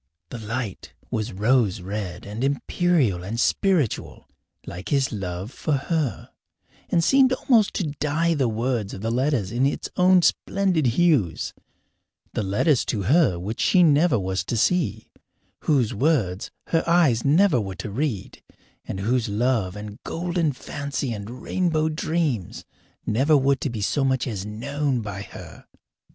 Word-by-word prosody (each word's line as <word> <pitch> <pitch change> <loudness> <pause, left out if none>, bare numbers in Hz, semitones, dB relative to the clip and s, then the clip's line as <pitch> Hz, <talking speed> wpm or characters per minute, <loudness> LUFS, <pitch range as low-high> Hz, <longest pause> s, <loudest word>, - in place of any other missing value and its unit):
The 120 - -7
light 110 -1 -5 0.2
was 110 -1 -2
rose 105 0 +2
red 95 -1 -5
and 105 +4 -5
imperial 140 - +1
and 110 +5 -4
spiritual, 170 - 0 0.4
like 90 +2 -7
his 135 -4 +1
love 95 0 -5
for 155 - -2
her, 140 -1 -2 0.6
and 170 - +2
seemed 265 +5 +5
almost 230 -5 +2
to 165 -7 -1
dye 155 +3 +1
the 135 -5 +1
words 115 -2 -2
of 95 - -8
the 115 +1 -1
letters 125 -5 0
in 125 +3 +2
its 140 - -3
own 180 0 +5
splendid 180 -8 +1
hues 120 - +1 0.8
the - - -1
letters 105 - +2
to 105 -5 -2
her 130 - +3
which 100 +6 -5
she 180 -2 +4
never 150 -3 +4
was 95 -1 -2
to 115 - -2
see, 175 +9 0 0.5
whose 130 -8 +2
words 110 - 0 0.2
her 165 - +2
eyes 155 -10 +4
never 155 - +4
were 95 -2 -5
to 105 - -6
read, 120 -3 -3 0.4
and 95 - -5
whose 115 +2 0
love 105 -3 0
and 105 +2 -8
golden 170 -2 -1
fancy 140 -1 -4
and 105 0 -7
rainbow 160 -4 0
dreams 155 - -2 0.4
never 140 +7 +3
were 140 0 +3
to 140 - -3
be 115 -3 -5
so 135 +8 0
much 130 -1 +1
as 105 -5 -4
known 135 +4 -2
by 100 -2 -5
her. - - -11
130 Hz, 150 wpm, -24 LUFS, 105-155 Hz, 0.8 s, seemed